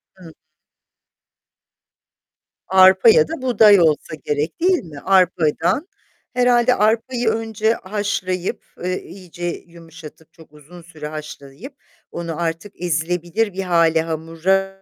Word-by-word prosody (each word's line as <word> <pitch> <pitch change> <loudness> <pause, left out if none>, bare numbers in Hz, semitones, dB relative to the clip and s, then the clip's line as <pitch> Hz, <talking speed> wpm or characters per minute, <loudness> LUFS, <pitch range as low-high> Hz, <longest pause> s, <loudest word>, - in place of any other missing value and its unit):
Hı. 175 -4 -14 2.3
Arpa 190 - +6
ya 465 +1 +5
da 325 -4 -6
buğday 220 -5 +5
olsa 155 -2 +1
gerek 150 +2 -2
değil 365 0 +2
mi? 155 -5 -11
Arpadan. 185 - +1 0.5
Herhâlde 245 0 +3
arpayı 230 +3 0
önce 220 0 -1
haşlayıp, 190 -3 -3 0.2
eee, 185 +1 -3
iyice 180 -2 -10
yumuşatıp, 165 -2 -10
çok 160 -2 -18
uzun 155 +4 -15
süre 160 -3 -9
haşlayıp 150 - -10 0.4
onu 170 -2 -6
artık 165 +4 -5
ezilebilir 175 +5 -1
bir 195 - -4
hâle, 165 -3 +2
hamura, 165 +4 -2
180 Hz, 110 wpm, -20 LUFS, 165-215 Hz, 2.3 s, Arpa